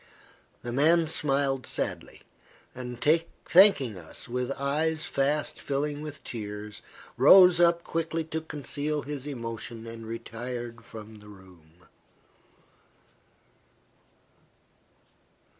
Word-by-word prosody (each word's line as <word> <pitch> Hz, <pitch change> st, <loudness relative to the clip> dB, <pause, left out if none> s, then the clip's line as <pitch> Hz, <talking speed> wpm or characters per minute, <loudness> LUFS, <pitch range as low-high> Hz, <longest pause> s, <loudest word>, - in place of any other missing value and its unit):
The 120 Hz, -, -4 dB
man 160 Hz, +5 st, +4 dB
smiled 140 Hz, -3 st, +1 dB
sadly, -, -, -4 dB, 0.5 s
and, 125 Hz, -1 st, -7 dB, 0.5 s
thanking 155 Hz, -, +5 dB
us 80 Hz, -2 st, -11 dB
with 125 Hz, +2 st, -2 dB
eyes 155 Hz, +3 st, -1 dB
fast 145 Hz, +2 st, -1 dB
filling 145 Hz, +1 st, -2 dB
with 150 Hz, -1 st, -8 dB
tears, 105 Hz, -2 st, -7 dB, 0.4 s
rose 180 Hz, +7 st, +8 dB
up 170 Hz, 0 st, +4 dB
quickly 165 Hz, 0 st, -2 dB
to 160 Hz, 0 st, -4 dB
conceal 150 Hz, 0 st, -3 dB
his 145 Hz, -1 st, -6 dB
emotion, 115 Hz, -3 st, -6 dB
and 115 Hz, -1 st, -8 dB
retired 115 Hz, +1 st, -6 dB
from 110 Hz, -1 st, -11 dB
the 105 Hz, 0 st, -15 dB
room. 90 Hz, -4 st, -18 dB
135 Hz, 95 wpm, -28 LUFS, 115-150 Hz, 0.5 s, rose